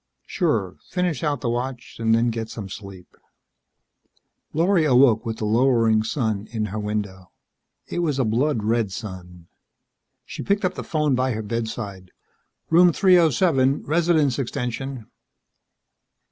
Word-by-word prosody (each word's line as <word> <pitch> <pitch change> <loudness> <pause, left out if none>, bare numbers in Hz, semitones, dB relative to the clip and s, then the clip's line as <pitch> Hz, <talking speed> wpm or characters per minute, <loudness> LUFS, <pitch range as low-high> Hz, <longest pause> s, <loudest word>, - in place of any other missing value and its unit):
"Sure 110 - -1
finish 180 -3 -1
out 145 -4 -1
the 120 - -1
watch 125 +1 -5
and 115 0 +3
then 115 +1 +2
get 110 -1 -4
some 110 -3 -7
sleep." 95 -2 -11 1.4
Lorry 170 +2 +2
awoke 125 -5 +4
with 110 0 -3
the 110 - -3
lowering 115 -1 +3
sun 110 -3 -2
in 110 -2 -2
her 110 - -2
window. 100 -3 -4 0.6
It - - -4
was 155 -5 0
a 130 - +1
blood 115 +2 0
red 110 -2 0
sun. 90 -4 -9 0.8
She - - -7
picked 200 0 0
up 185 - 0
the - - -6
phone 150 -3 0
by 130 0 +1
her 110 0 -4
bedside. 105 -4 -5 0.6
"Room 175 +2 +6
307 160 - +3
Resident's 155 -4 +2
extension." 125 0 -4
120 Hz, 135 wpm, -23 LUFS, 110-150 Hz, 1.4 s, Room